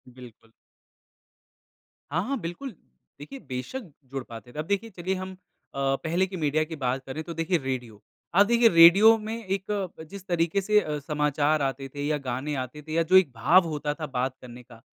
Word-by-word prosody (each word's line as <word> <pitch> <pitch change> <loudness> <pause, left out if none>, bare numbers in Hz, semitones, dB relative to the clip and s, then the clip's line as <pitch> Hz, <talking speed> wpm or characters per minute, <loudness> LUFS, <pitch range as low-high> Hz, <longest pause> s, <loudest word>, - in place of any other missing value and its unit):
बिल्कुल। 115 -3 -14 1.6
हाँ, 170 +5 0
हाँ। 275 +1 -1
बिल्कुल 180 +10 -6 0.5
देखिए 205 - -9
बेशक़ 130 - -5 0.3
जुड़ 135 -2 -4
पाते 115 +1 -11
थे। 150 - -7
अब 155 - -2
देखिए 200 +4 -1
चलिए 185 0 -3
हम 185 0 -7 0.4
अ, 135 0 +1
पहले 170 +4 +1
की 185 -1 -7
मीडिया 155 0 +1
की 160 +1 -7
बात 130 -2 -2
करें 150 +4 -5
तो 170 - -7
देखिए 165 +2 0
रेडियो। 120 -5 -5 0.3
आप 200 +1 +7
देखिए 235 +1 +4
रेडियो 190 +6 +8
में 220 +1 -6
एक 195 +1 -3 0.3
अ, - - -7
जिस 190 +4 -11
तरीके 170 +2 +1
से 210 +2 +4
अ, 150 -5 -3
समाचार 150 +1 0
आते 135 0 -2
थे 145 - -3
या 150 -1 +1
गाने 130 +4 -2
आते 140 +4 -10
थे 155 +1 -8
या 165 - +3
जो 185 - +7
एक 170 -8 +4
भाव 175 +9 +5
होता 150 -1 -2
था 155 0 -6
बात 130 +1 -1
करने 125 0 -11
का। 115 -1 -16
155 Hz, 195 wpm, -26 LUFS, 135-185 Hz, 1.6 s, रेडियो